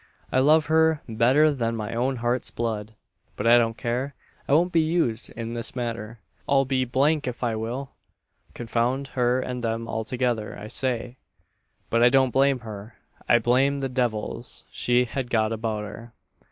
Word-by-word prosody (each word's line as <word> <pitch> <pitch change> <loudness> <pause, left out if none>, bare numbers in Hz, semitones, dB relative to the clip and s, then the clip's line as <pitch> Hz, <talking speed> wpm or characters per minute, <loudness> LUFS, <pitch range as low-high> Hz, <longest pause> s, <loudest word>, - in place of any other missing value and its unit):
"I 130 - +3
love 150 +3 +5
her 160 -1 +3
better 125 +7 +4
than 115 -4 -1
my 110 0 -4
own 125 +3 0
heart's 120 +1 -1
blood; 110 -2 -4 0.4
but - - -4
I 120 +1 +7
don't 115 -1 0
care 125 +4 -2 0.3
I - - +1
won't 175 +4 +4
be 165 - +4
used 155 -9 0
in 115 0 -5
this 120 +1 -3
manner 115 -2 -4 0.3
I'll 135 -1 +4
be 130 -1 0
d 140 +6 +2
d - - -14
if 125 - -7
I 115 -2 0
will! 120 +5 -4 0.6
Confound 120 +4 -1
her 125 0 +1
and 125 -1 -4
them 115 0 -2
altogether, 115 -1 -2
I 105 +1 -8
say! 125 0 -2 0.7
But 115 - +3
I 120 - +7
don't 130 -1 +3
blame 135 0 +2
her 110 0 -9 0.3
I 120 - +7
blame 130 +4 +2
the 135 - -2
devils 120 -2 -2
she 125 0 +2
has 125 +1 -4
got 110 -2 +1
about 110 -1 -2
her. 115 +2 -9
120 Hz, 175 wpm, -25 LUFS, 115-135 Hz, 0.7 s, I